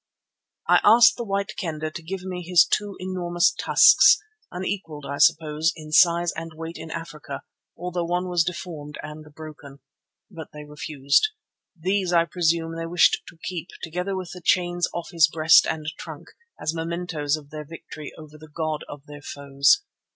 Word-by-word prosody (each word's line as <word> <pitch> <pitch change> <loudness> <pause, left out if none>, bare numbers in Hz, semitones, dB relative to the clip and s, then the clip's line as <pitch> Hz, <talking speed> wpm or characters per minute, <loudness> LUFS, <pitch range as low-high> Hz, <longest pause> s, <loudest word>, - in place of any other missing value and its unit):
I - - +6
asked 230 +2 +7
the 240 - -3
White 200 -1 -2
Kendah 155 -4 -4
to 170 - -8
give 180 +3 -6
me 185 -1 -5
his 175 -1 +5
two 205 -2 -1
enormous 175 -2 +1
tusks, - - +6 0.3
unequalled, 180 -5 -5
I 140 +1 -5
suppose, 155 +1 +3
in 155 -2 -11
size 170 +1 +4
and 165 0 -7
weight 165 +1 -7
in - - -8
Africa, 150 -4 -7 0.3
although 180 -1 -3
one 180 +2 -1
was 175 -2 +2
deformed 165 -4 -6
and 150 0 -10
broken. 150 -3 -11 0.5
But 160 -4 -9
they 150 0 -9
refused. 150 - +1 0.5
These, 185 +1 0
I 170 -1 +4
presume, 165 -1 0
they 165 0 -4
wished 175 0 +3
to 165 - -13
keep, 175 -2 -5 0.2
together 180 +4 -3
with 185 -2 -5
the 180 - -10
chains 175 -1 +1
off 170 -1 -6
his 165 -3 +5
breast 160 0 +5
and 155 -1 -3
trunk, - - -9 0.3
as 155 - -2
mementoes 165 -3 -2
of 145 -2 -14
their 155 0 -6
victory 155 -1 -10
over 155 -1 -13
the 155 0 -14
god 155 -1 -3
of 145 -1 -10
their 145 0 -11
foes. 140 - +2
165 Hz, 170 wpm, -24 LUFS, 155-180 Hz, 0.5 s, asked